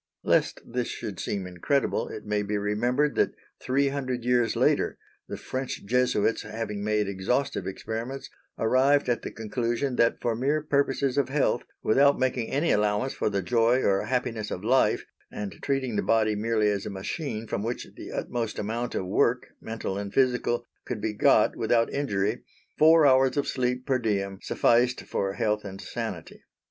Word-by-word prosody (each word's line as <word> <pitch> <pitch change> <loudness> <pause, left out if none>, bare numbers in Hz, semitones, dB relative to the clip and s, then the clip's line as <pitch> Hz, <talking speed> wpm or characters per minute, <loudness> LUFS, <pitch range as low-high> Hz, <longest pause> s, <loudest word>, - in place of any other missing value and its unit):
Lest - - +2
this 125 0 -2
should 100 -4 -6
seem 100 -2 -3
incredible 90 +10 0
it 110 - -8
may 105 0 0
be 105 0 -2
remembered 120 +8 +1
that - - +1 0.3
three 140 +2 +1
hundred 130 -3 -3
years 120 -2 +2
later, - - +2 0.3
the - - -5
French 130 -4 -5
Jesuits, 120 -1 +1
having 110 -1 -5
made 105 -1 +1
exhaustive 100 +3 -1
experiments, 115 +7 -5 0.3
arrived 130 +5 +3
at 120 - +1
the - - -5
conclusion 120 +3 -2
that 115 - +3
for 115 -2 0
mere 145 +6 0
purposes 140 -2 +1
of 135 - 0
health, 145 +2 +1 0.2
without 140 +5 +4
making 130 -3 0
any 150 +5 +1
allowance 105 +5 +1
for - - -1
the 100 -2 -1
joy 120 +4 +3
or 95 0 +2
happiness 115 -3 -2
of 90 - -5
life, 130 +4 +2 0.3
and 105 -2 -6
treating 130 -5 -1
the - - +2
body 110 -1 +2
merely 110 0 +1
as 100 -1 -1
a - - -3
machine 110 - -4
from 100 - -3
which 115 +3 -3
the - - -9
utmost 115 -3 -3
amount 115 +3 -3
of 95 - -1
work 115 +6 +1
mental 110 -3 -4
and 100 -1 -6
physical 125 -2 +2 0.2
could 120 - -4
be 105 +1 -2
got - - +4
without 115 -1 +1
injury, 110 -5 -1 0.3
four 160 0 +6
hours 130 0 +4
of 145 - +1
sleep 125 0 -1
per 130 -1 +1
diem 100 -4 -1
sufficed 120 +1 +2
for 95 0 -2
health 105 -1 0
and 95 -1 -8
sanity. - - -6
115 Hz, 170 wpm, -27 LUFS, 105-130 Hz, 0.3 s, four